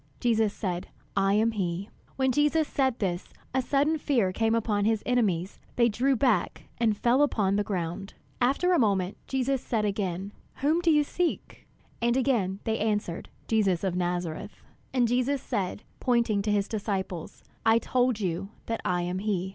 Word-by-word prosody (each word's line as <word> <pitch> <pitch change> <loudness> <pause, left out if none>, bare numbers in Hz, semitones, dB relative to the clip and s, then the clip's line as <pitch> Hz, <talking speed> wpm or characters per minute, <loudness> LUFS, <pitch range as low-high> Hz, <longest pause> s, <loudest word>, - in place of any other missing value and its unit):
Jesus 225 -3 +2
said, 180 -4 -3 0.3
"I 195 0 +3
am 220 +2 +3
he." 190 -2 -3 0.2
When 265 -1 +2
Jesus 295 +3 +2
said 265 -3 +1
this, 180 -3 -2 0.2
a 260 - +2
sudden 290 +4 +1
fear 230 -11 +1
came 225 +2 +2
upon 210 -3 0
his 220 0 +1
enemies; 200 -8 0 0.2
they 235 -1 +4
drew 260 +5 +2
back 245 -2 +1 0.2
and 220 -3 +2
fell 245 +5 +3
upon 205 -9 +2
the 205 - +2
ground. 185 -1 -4 0.3
After 280 +9 +3
a 350 - +4
moment, 195 -5 +1
Jesus 265 0 0
said 220 -3 0
again, 195 -1 -2 0.2
"Whom 310 +5 +1
do 345 - +2
you 300 -2 +5
seek?" 350 +4 -3 0.3
And 240 +1 +2
again 215 -8 +1
they 225 0 -1
answered, 210 -6 -1 0.2
"Jesus 200 -6 +2
of 190 -2 0
Nazareth." 175 +2 -3 0.3
And 250 -2 +2
Jesus 255 +4 +1
said, 205 -5 -3 0.2
pointing 235 -5 +2
to 210 +1 -1
his 205 -1 +1
disciples, 195 -5 -4 0.2
"I 225 0 +5
told 245 -1 +1
you 190 0 -2 0.2
that 230 0 -3
I 180 -1 0
am 180 +1 -2
he. 190 -3 -1
220 Hz, 170 wpm, -28 LUFS, 195-250 Hz, 0.3 s, you